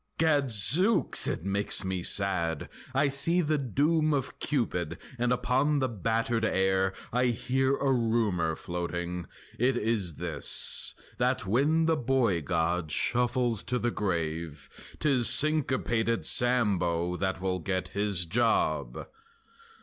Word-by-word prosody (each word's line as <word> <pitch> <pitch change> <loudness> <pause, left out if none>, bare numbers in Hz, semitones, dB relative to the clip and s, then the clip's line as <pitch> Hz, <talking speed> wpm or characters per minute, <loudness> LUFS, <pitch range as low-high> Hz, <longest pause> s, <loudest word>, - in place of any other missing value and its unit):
Gadzooks! 150 - +3
it - - -3
makes 100 +2 +1
me 95 -1 -2
sad! 85 -5 +1 0.2
I 140 +2 +2
see 140 +6 +1
the 155 -2 0
doom 150 +5 +1
Of 135 -2 -4
Cupid, 90 - -2 0.2
and 125 0 +1
upon 130 +4 +1
the 130 -2 +1
battered 115 +1 -1
air 95 -2 +1 0.2
I 125 +1 +2
hear 130 +3 0
a 135 -1 +1
rumor 110 -9 0
floating. 85 0 -5 0.3
It 125 +1 +2
is 105 -8 -1
this: - - +1 0.2
That - - 0
when 145 +11 +2
the 160 -1 +2
boy 120 - +1
god 85 0 -1
shuffles 120 - 0
to 125 +2 -1
the 120 0 -1
grave 80 -7 -3 0.3
'Tis 135 -6 +2
Syncopated 125 -5 +1
Sambo 90 -8 +1
that 95 0 -2
will 95 -1 -2
get 95 +1 -3
His 100 -3 -1
job! 115 +7 0
115 Hz, 125 wpm, -28 LUFS, 90-130 Hz, 0.3 s, Gadzooks